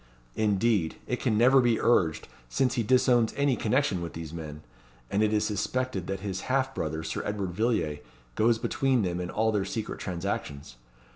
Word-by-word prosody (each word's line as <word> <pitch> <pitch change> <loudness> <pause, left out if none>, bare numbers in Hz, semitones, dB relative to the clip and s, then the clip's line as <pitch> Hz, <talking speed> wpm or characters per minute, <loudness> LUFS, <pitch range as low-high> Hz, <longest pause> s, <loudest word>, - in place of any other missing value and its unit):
Indeed, 105 -4 +1
it 125 - -2
can 115 -5 +1
never 130 +4 +6
be 120 -2 +2
urged, 90 -9 +2 0.2
since 125 - +1
he 120 - 0
disowns 120 0 +3
any 140 -2 +2
connection 115 -4 +1
with 85 - -5
these 80 -1 -7
men; 75 -2 -7 0.5
and 100 - +1
it 105 -1 +3
is 105 -1 +2
suspected 105 -1 -2
that 95 -1 -3
his 95 -2 -4
half 135 0 +1
brother, 80 - -3
Sir - - -3
Edward 100 -3 -3
Villiers, 90 -7 0 0.3
goes 115 - +3
between 130 0 +1
them 90 -1 -2
in 90 - -4
all 110 +3 +1
their 105 -2 0
secret 105 +3 -4
transactions. 85 -8 -4
105 Hz, 175 wpm, -28 LUFS, 90-120 Hz, 0.5 s, never